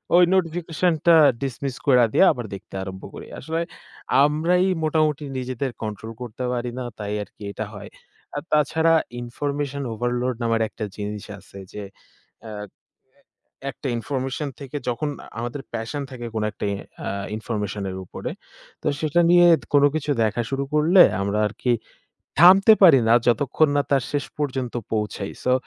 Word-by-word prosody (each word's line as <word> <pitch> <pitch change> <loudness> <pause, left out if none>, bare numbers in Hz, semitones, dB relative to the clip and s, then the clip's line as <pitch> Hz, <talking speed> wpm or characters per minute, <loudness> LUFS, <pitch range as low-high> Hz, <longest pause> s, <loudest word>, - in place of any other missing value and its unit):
ওই 180 - +7
নোটিফিকেশনটা 170 -1 +2 0.3
ডিসমিস 135 0 -3
কইরা 125 -4 +6
দিয়া, 190 - +6
আবার 120 -2 -6
দেখতে 95 - -13
আরম্ভ 95 0 -8
করি। - - -9
আসলে 160 +3 -2 0.6
আমরাই 170 +5 +2 0.2
মোটামুটি 155 -1 +1
নিজেদের 130 +1 -3
কন্ট্রোল 110 +1 -5
করতে 125 +1 -6
পারি 120 0 -2
না। - - -3 0.2
তাই 105 0 -3
আরকি 100 - -20
এটা - - -4
হয়। - - -9 0.5
আ - - +1
তাছাড়া 160 +2 +3 0.3
ইনফরমেশন 140 +3 -3
ওভারলোড 120 +2 -1
নামের 115 -1 +1
একটা 110 - -5
জিনিস 105 0 -5 0.2
আছে 100 0 -15 0.2
যে, 105 - -6 0.6
আ - - -7
এ 105 -2 -12 0.5
একটা 135 - -7
ইনফরমেশন 135 +4 -3
থেকে 140 +1 -6
যখন 135 +5 -2 0.3
আমাদের 120 +4 -4
প্যাশন 115 +6 -3
থাকে, 120 -2 -7
কোন 110 - 0
একটা 105 - -5
ই - - -2 0.3
আ - - -1 0.3
ইনফরমেশন 105 -3 -4
এর - - -6
উপরে। - - -6 0.5
তো - - -3
সেটা 160 +2 +2
নিয়ে 175 0 +7 0.3
কোনো 145 0 +6
কিছু 150 -1 -1
দেখা 110 +2 0
শুরু 135 0 -1
করলে, 165 +5 +6 0.2
আমরা 100 +2 0
আরকি 120 +3 -1 0.7
থামতে 190 +5 +8
পারি 150 -9 +8
না। 115 - +6
যতক্ষণ 135 +5 +3
না 145 - +3
তার 135 -3 +3
শেষ 145 -2 0
পর্যন্ত 130 -4 -2 0.2
পৌঁছাই। 105 -2 -2
সো 125 - +3
130 Hz, 155 wpm, -23 LUFS, 115-150 Hz, 0.7 s, থামতে